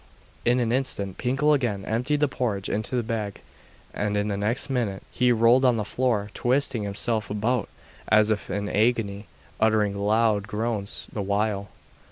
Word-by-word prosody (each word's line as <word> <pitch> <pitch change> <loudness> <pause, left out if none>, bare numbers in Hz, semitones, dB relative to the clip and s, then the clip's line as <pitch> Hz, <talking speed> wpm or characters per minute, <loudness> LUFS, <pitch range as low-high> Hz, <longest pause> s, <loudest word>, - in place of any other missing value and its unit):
In 120 +1 +3
an 115 -2 0
instant 105 -7 -1
Pinkel 135 +4 +2
again 110 -9 -1
emptied 125 +7 0
the 150 - +4
porridge 110 -8 -2
into 110 +4 -1
the 120 - +1
bag, 110 -3 -3 0.5
and 105 0 -1
the 105 0 0
next 105 +5 -1
minute 115 -8 -2
he 125 0 +2
rolled 120 +3 +5
on 125 -3 +4
the 105 - -2
floor, 110 -4 0
twisting 130 -1 +1
himself 105 +2 -1
about 110 +3 0 0.4
as 110 0 +4
if 105 - -2
in 105 +1 -2
agony, 105 -2 0 0.3
uttering 110 -2 +2
loud 105 0 +2
groans 110 -2 -3
the 105 - -2
while. 100 0 -1
110 Hz, 160 wpm, -25 LUFS, 105-125 Hz, 0.5 s, rolled